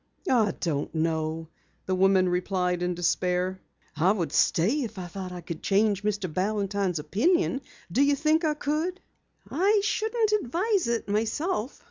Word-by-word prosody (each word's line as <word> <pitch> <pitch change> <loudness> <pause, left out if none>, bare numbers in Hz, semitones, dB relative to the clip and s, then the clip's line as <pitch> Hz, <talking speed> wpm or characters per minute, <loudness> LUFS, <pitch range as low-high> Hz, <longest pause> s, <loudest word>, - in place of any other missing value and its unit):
"I 220 -5 +3
don't 155 -3 -2
know," 160 0 -1 0.4
the 190 - -1
woman 190 0 +4
replied 180 0 0
in 180 0 -1
despair. 180 +1 0 0.3
"I 170 +5 +3
would 185 -6 -1
stay 220 - +2
if 225 -4 -5
I 185 - -5
thought 185 +1 -7
I 180 -1 -7
could 170 -1 -7
change 200 0 +2
Mr. 205 -2 -1
Balantine's 195 +1 -1
opinion. 265 - +1 0.3
Do 255 - +2
you 285 0 +4
think 310 +3 +2
I 305 -1 +1
could?" 310 +6 -2 0.5
"I 400 +7 +3
shouldn't 435 +1 0
advise 370 - 0
it 235 -2 -1
myself. 225 - -1
200 Hz, 150 wpm, -27 LUFS, 180-285 Hz, 0.5 s, woman